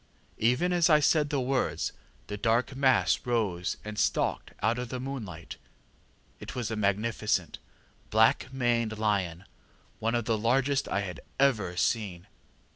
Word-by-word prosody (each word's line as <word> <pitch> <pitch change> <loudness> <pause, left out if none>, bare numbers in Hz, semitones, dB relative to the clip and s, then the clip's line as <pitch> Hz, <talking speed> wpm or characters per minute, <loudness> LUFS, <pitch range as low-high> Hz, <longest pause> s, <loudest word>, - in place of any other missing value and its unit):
ŌĆ£Even 125 +11 +2
as 175 -1 +3
I 150 -1 +6
said 150 0 +3
the 145 -2 0
words, 130 0 0 0.3
the 105 - -5
dark 115 +5 +1
mass 130 -10 +3
rose 105 -8 -1
and 105 0 -5
stalked - - 0
out 120 +3 +2
into 125 -1 -4
the 130 - -4
moonlight. 110 - -6 0.8
It - - -8
was 120 -3 -3
a - - -1
magnificent, 105 +1 0 0.5
black 110 +4 +3
maned 120 -4 0
lion, 100 -5 -1 0.5
one 115 +2 0
of 120 -2 -1
the 110 -1 0
largest 135 +5 +1
I 100 - 0
had 90 -5 -6 0.2
ever 105 -11 +2
seen. 95 -5 -1
115 Hz, 145 wpm, -29 LUFS, 105-130 Hz, 0.8 s, I